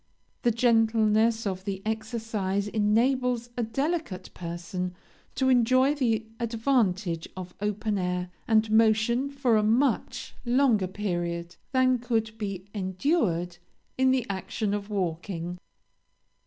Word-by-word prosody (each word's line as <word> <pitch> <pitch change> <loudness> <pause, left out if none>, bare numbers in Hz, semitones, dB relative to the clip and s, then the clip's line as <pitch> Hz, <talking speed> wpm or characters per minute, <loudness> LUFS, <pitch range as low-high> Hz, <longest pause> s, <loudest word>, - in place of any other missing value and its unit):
The 240 - +3
gentleness 225 -1 +3
of 190 -2 -3
the 195 -1 -3
exercise 220 -3 -2
enables 240 +3 +1
a 245 - -1
delicate 255 - -2
person 175 +1 -5 0.4
to 260 - +1
enjoy 255 +3 +4
the 230 -6 0
advantage 220 -8 0
of 180 -1 -7
open 210 0 -1
air 180 0 -2 0.2
and 220 -2 +3
motion 225 +4 +3
for 270 -5 +2
a - - +3
much 235 +4 +1
longer 240 -6 +3
period 175 -3 -3 0.2
than 255 -1 +3
could 225 -2 -1
be 195 -3 -4
endured 185 - 0 0.4
in 260 0 +3
the 260 -2 +2
action 200 +1 -2
of 205 0 -3
walking. 175 -2 -3
220 Hz, 115 wpm, -27 LUFS, 190-240 Hz, 0.4 s, enjoy